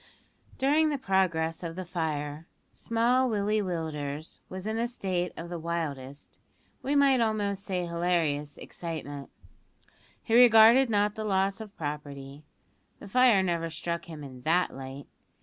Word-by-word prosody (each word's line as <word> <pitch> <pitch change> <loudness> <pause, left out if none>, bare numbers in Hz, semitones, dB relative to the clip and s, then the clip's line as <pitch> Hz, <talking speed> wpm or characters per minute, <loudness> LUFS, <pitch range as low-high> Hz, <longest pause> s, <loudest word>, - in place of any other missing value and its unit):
During 300 +4 +3
the 290 - -1
progress 180 -8 0
of 165 -2 -5
the 185 0 -5
fire, 155 -3 -3 0.3
small 245 +3 +1
Willie 210 0 +1
Willders 155 -4 -4
was 185 +1 -7
in 220 +1 -2
a 235 - +1
state 185 -7 -2
of 170 +1 -7
the 175 - -4
wildest, 145 -5 -5 0.4
we 280 +2 -1
might 275 -3 +5
almost 205 -3 0
say 180 -2 -2
hilarious, 170 -4 -1
excitement; 145 -4 -7 0.9
he 225 - -3
regarded 235 +1 +7
not 205 -1 +2
the 220 - -5
loss 195 0 0
of 210 -2 -11
property; 145 -1 -6 0.5
the - - -11
fire 235 -2 +5
never 170 -2 -1
struck 170 +1 -4
him 155 -3 -9
in 130 -2 -10
that 170 +6 +1
light. 135 +1 -8
175 Hz, 145 wpm, -28 LUFS, 155-215 Hz, 0.9 s, regarded